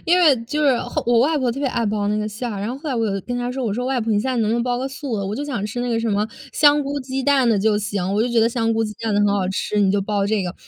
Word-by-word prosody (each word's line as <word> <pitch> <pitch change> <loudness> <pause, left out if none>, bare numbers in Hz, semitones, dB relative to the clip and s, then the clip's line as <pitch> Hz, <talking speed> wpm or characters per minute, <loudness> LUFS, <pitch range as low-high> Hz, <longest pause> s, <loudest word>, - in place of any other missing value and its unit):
因 350 +2 +4
为 315 -7 +5
就 300 +6 -2
是 260 -4 +4
后 - - -3
我 235 0 +3
外 300 +6 +3
婆 255 -3 +1
特 245 - -5
别 275 -2 0
爱 235 -2 -1
包 205 -1 -1
那 210 +1 0
个 215 0 -2
馅 235 +4 -5
儿， 195 - -5
然 210 - -3
后 255 - -4
后 310 - -6
来 270 - -1
我 230 -2 0
有 195 -2 -1
跟 245 0 -4
她 245 0 -2
说， 260 0 -3
我 210 -3 -1
说： 250 +1 -2
“外 265 -2 0
婆， 225 -1 -1
你 205 - +2
现 260 +4 -1
在 255 - -1
能 220 -2 +1
不 - - +1
能 235 - 0
包 245 0 -1
个 265 - -2
素 270 -3 -4
的， 195 - -3
我 205 - -3
就 285 - -3
想 240 -8 -3
吃 245 +3 -4
那 245 - -2
个 230 -1 0
什 230 - -1
么 205 0 +1 0.3
香 295 -1 +5
菇 280 0 -3
鸡 260 0 -4
蛋 275 -4 +3
的， 220 - +3
就 210 +1 +2
行。 200 -2 -2
我 215 - +2
就 245 - 0
觉 235 - +1
得 225 +1 +4
香 230 -1 0
菇 225 0 +1
鸡 210 - -4
蛋 225 -2 -1
的 205 - +2
很 205 - +3
好 195 -2 0
吃， 205 +2 -1
你 195 -1 +3
就 205 - +1
包 200 0 -1
这 205 -1 0
个。” 180 0 -4
230 Hz, 400 characters per minute, -21 LUFS, 210-260 Hz, 0.3 s, 为